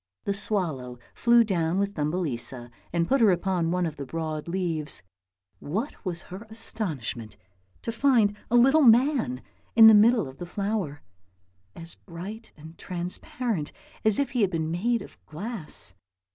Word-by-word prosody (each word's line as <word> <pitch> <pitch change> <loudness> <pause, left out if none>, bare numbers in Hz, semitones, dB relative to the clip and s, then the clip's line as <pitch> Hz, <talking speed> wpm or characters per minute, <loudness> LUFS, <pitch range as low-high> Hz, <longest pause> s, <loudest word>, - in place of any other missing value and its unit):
The 200 - 0
swallow 160 - -1 0.2
flew 235 0 +5
down 175 -5 0
with 200 0 0
Thumbelisa 145 -7 -3 0.2
and 170 0 0
put 275 -1 +2
her 220 - +6
upon 180 -2 +1
one 180 +1 +1
of 160 - -4
the 140 - -5
broad 155 +1 -4
leaves; 170 - -2 0.6
what 215 - -4
was 175 -3 -3
her 195 +5 -10
astonishment 140 - -4 0.5
to 230 - -2
find 230 -4 +3
a 240 - +2
little 270 +6 +6
man 240 - +4 0.3
in 225 -1 +9
the 220 - +10
middle 220 - +5
of 130 +1 -11
the 175 - -6
flower, 195 -6 -3 0.7
as 165 0 -9
bright 200 +6 -9
and 160 +2 -13
transparent 180 - -4 0.3
as 215 -2 +3
if 280 -3 0
he 245 - 0
had 200 - +3
been 160 -3 -2
made 230 +7 0
of - - -16
glass. 195 +2 -4
185 Hz, 155 wpm, -26 LUFS, 160-225 Hz, 0.7 s, the